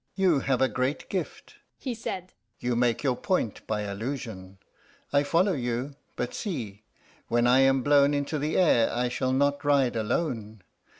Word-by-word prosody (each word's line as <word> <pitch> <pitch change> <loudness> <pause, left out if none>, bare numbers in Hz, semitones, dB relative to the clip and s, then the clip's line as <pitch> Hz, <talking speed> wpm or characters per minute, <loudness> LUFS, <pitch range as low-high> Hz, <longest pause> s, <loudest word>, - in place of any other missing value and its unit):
"You 185 -7 +3
have 135 -1 +1
a - - +4
great 130 +5 -2
gift," - - -5 0.2
he 255 - -4
said; 185 -5 -6 0.3
"you 120 0 -1
make 120 +1 +1
your 130 -3 +2
point 150 - -2
by 105 -1 -1
allusion. 105 -2 -5 0.6
I 140 - +5
follow 170 +7 +2
you. 125 0 -2 0.2
But 125 - -3
see: 115 - -5 0.5
when 120 0 +2
I 125 +2 +5
am 135 -1 +4
blown 145 0 +4
into 145 +2 -2
the 150 +2 -1
air 155 -11 +4
I 125 +1 0
shall 130 +1 -1
not 140 +2 +1
ride 140 -4 +3
alone. 110 - -2
130 Hz, 165 wpm, -27 LUFS, 120-145 Hz, 0.6 s, I